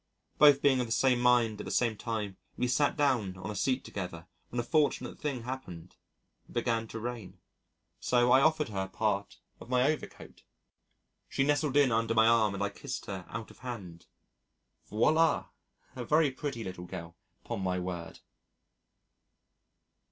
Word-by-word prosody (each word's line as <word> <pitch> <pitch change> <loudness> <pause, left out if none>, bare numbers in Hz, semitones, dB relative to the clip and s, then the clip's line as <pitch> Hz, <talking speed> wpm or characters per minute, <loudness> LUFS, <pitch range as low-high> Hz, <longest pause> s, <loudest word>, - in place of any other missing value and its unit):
Both 145 -2 +7
being 135 -2 +4
of 125 - -1
the - - -9
same 125 +1 +3
mind 120 -3 +3
at - - -8
the - - -5
same 115 -3 +1
time 105 -3 -4 0.2
we 125 - +1
sat 145 +5 +2
down 120 -11 +1
on 95 +3 -5
a - - -6
seat 130 +4 0
together 90 -4 -6 0.2
when 120 - -3
a - - 0
fortunate 145 -2 0
thing 135 -6 -3
happened. 120 -10 -7 0.5
It - - -14
began 115 -1 0
to 115 - -6
rain. 120 -3 -6 0.6
So 125 0 +3
I 130 - +7
offered 155 -2 +2
her 95 -2 -3
part 100 0 -2 0.2
of - - -12
my 125 0 +3
overcoat. 150 +3 -3 0.9
She 135 - +1
nestled 145 0 +1
in 140 -3 +5
under 115 0 +1
my 110 0 +6
arm 110 -3 +4
and 100 - -2
I 100 - 0
kissed 130 +6 -6
her 95 -4 -6
out 110 +1 -6
of - - -18
hand. 95 -10 -8 0.8
Voilà! 155 +10 +3 0.5
A 125 - -4
very 150 +2 +3
pretty 130 -3 -4
little 90 -2 -7
girl, 85 -1 -8 0.3
'pon - - -4
my 90 -1 0
word. 90 -2 -5
115 Hz, 165 wpm, -30 LUFS, 100-130 Hz, 0.9 s, Both